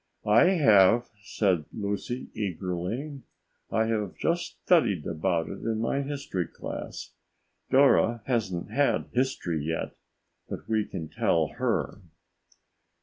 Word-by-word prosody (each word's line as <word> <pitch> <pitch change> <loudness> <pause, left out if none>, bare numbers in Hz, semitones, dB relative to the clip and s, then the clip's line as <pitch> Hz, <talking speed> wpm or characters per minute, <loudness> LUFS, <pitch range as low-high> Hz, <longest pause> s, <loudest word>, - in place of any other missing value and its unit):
"I 105 +9 +6
have," 120 - +5
said 95 -5 0
Lucy 105 +5 -4
eagerly. 100 - -4 0.5
"I 110 - +1
have 105 -4 -2
just 170 +1 -1
studied 110 - +3
about 85 0 -1
it - - -7
in 110 -1 -2
my 125 +5 0
history 135 - -3
class. - - -7 0.6
Dora 130 -4 +4
hasn't 100 -9 -1
had 145 0 +1
history 120 - -1
yet, 80 +2 -3 0.5
but - - -7
we 110 -2 +1
can 85 -5 -6
tell 80 0 +1
her." - - -2
110 Hz, 115 wpm, -27 LUFS, 90-130 Hz, 0.6 s, I